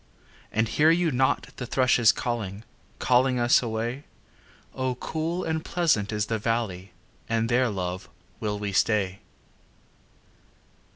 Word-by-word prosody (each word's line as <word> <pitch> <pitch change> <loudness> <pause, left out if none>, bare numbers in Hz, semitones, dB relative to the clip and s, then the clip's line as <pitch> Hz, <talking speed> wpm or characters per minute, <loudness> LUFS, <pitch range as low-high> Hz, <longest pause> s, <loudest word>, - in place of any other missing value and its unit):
And 110 +1 +1
hear 150 +7 +3
you 165 0 +3
not 130 +1 +1
the 125 - -5
thrushes 125 -3 +4
calling, 110 -4 -4 0.3
Calling 125 +1 +3
us 120 0 +4
away? 120 +4 -3 0.7
O 130 -1 -2
cool 160 +7 -3
and 160 -1 -2
pleasant 155 - +1
is 105 -1 0
the 110 0 -2
valley 105 -5 -2 0.4
And 115 0 0
there, 125 +1 +3
love, 90 -3 -4 0.3
will 105 -1 -2
we 100 -1 -3
stay. 100 -1 +1
115 Hz, 125 wpm, -26 LUFS, 105-130 Hz, 0.7 s, thrushes